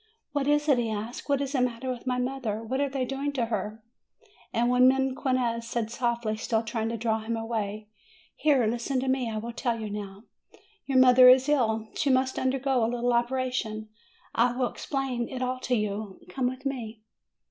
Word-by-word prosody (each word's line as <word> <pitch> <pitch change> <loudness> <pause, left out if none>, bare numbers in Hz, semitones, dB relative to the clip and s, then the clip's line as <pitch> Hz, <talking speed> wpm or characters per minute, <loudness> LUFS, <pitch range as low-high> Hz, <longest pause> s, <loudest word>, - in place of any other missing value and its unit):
"What 285 -1 -1
is 295 +1 +2
it," 275 -4 +4
he 230 -2 0
asked. 220 +6 -5
"What 280 -1 +2
is 275 -1 -2
the 270 -3 +1
matter 250 0 -1
with 250 +1 -7
my 250 -1 +1
mother? 250 -4 -2
What 260 +5 -2
are 285 - +1
they 265 -1 -1
doing 275 +2 -2
to 250 -4 0
her?" 215 0 -4 0.7
And 240 +2 +2 0.2
then 265 0 +1
Mequinez 245 -3 -1
said 230 -2 -2
softly, 235 -2 -1
still 225 0 0
trying 225 0 -2
to 230 - -3
draw 220 0 0
SUMMER 225 +1 -3
295 - - -5
him - - -5 0.3
away: 215 0 -12 0.5
"Here! 280 -6 +3
Listen 240 +4 -1
to 265 - -3
me. 260 -2 +1
I 220 - -3
will 230 +2 -4
tell 235 -1 -1
you 215 -2 -5
now. 200 0 -6 0.6
Your 270 -2 +1
mother 255 0 +8
is 260 +1 +6
ill; 225 -7 +1
she 285 - 0
must 260 0 +2
undergo 260 -1 +1
a 225 - +2
little 245 0 0
operation; 240 -3 -1 0.4
I 240 +1 +3
will 255 -2 0
explain 265 -4 -3
it 255 -1 -4
all 255 0 -2
to 255 -1 0
you: 210 -2 -3
come 260 -2 -1
with 255 +2 -5
me." 230 -5 -4
245 Hz, 205 wpm, -27 LUFS, 225-260 Hz, 0.7 s, mother